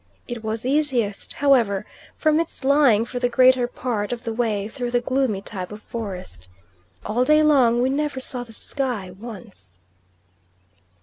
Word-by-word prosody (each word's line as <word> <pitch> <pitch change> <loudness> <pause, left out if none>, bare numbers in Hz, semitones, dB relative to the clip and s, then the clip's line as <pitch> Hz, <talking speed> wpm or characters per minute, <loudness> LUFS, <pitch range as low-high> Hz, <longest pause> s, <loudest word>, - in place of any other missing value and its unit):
It 240 -2 -6
was 220 +1 -3
easiest 255 -7 0
however, 240 -9 +2 0.3
from 310 0 +3
its 330 -4 -4
lying 265 -6 +4
for 245 +1 -5
the 245 0 +1
greater 255 0 +5
part 235 -4 -3
of 240 -1 -4
the 230 -2 -3
way 220 -4 -1
through 245 +1 -4
the 245 0 +2
gloomy 245 -5 -1
type 185 -3 -6
of 210 0 -9
forest. 190 - -7 0.6
All 230 +4 +1
day 305 +3 +5
long 250 -6 +4
we 260 - +2
never 290 -1 -1
saw 255 -1 -3
the 235 - -14
sky 230 -5 -3
once. 180 - -11
240 Hz, 160 wpm, -23 LUFS, 210-265 Hz, 0.6 s, greater